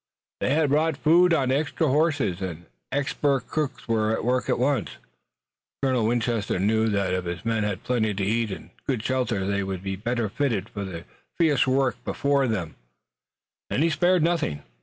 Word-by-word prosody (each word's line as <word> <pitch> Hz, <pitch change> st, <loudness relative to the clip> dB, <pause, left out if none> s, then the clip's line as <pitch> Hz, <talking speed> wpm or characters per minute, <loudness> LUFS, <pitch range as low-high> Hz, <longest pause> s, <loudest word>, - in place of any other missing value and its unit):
They 140 Hz, -, +1 dB
had 155 Hz, -2 st, +2 dB
brought 155 Hz, 0 st, +2 dB
food 170 Hz, +4 st, +5 dB
on 135 Hz, -6 st, +2 dB
extra 150 Hz, +3 st, 0 dB
horses, 145 Hz, -, +1 dB
and 85 Hz, -2 st, -5 dB, 0.3 s
expert 140 Hz, 0 st, +1 dB
cooks 135 Hz, -5 st, -3 dB
were 110 Hz, -1 st, +1 dB
at 110 Hz, -, -1 dB
work 125 Hz, +1 st, +1 dB
at -, -, +2 dB
once. 130 Hz, -4 st, 0 dB, 0.9 s
Colonel 130 Hz, -5 st, +2 dB
Winchester 115 Hz, -3 st, 0 dB
knew 110 Hz, +4 st, +2 dB
that 100 Hz, -3 st, 0 dB
if 90 Hz, -1 st, -1 dB
his 85 Hz, +5 st, -5 dB
men 115 Hz, -1 st, +1 dB
had 100 Hz, -3 st, -3 dB
plenty 115 Hz, -4 st, +1 dB
to 100 Hz, 0 st, -1 dB
eat 115 Hz, +2 st, +1 dB
and 95 Hz, -, -8 dB, 0.2 s
good 125 Hz, -6 st, -1 dB
shelter 125 Hz, -7 st, 0 dB
they 100 Hz, 0 st, 0 dB
would 95 Hz, -1 st, -4 dB
be 95 Hz, 0 st, -2 dB
better 115 Hz, +3 st, -1 dB
fitted 110 Hz, -3 st, -1 dB
for 100 Hz, -, -5 dB
the 85 Hz, -4 st, -7 dB, 0.3 s
fierce 150 Hz, -6 st, +3 dB
work 130 Hz, 0 st, +1 dB
before 140 Hz, -1 st, +1 dB
them, 90 Hz, -, -3 dB, 0.9 s
and 140 Hz, -, +1 dB
he 165 Hz, -, +2 dB
spared 175 Hz, +1 st, +3 dB
nothing. 155 Hz, -, 0 dB
120 Hz, 180 wpm, -25 LUFS, 100-140 Hz, 0.9 s, food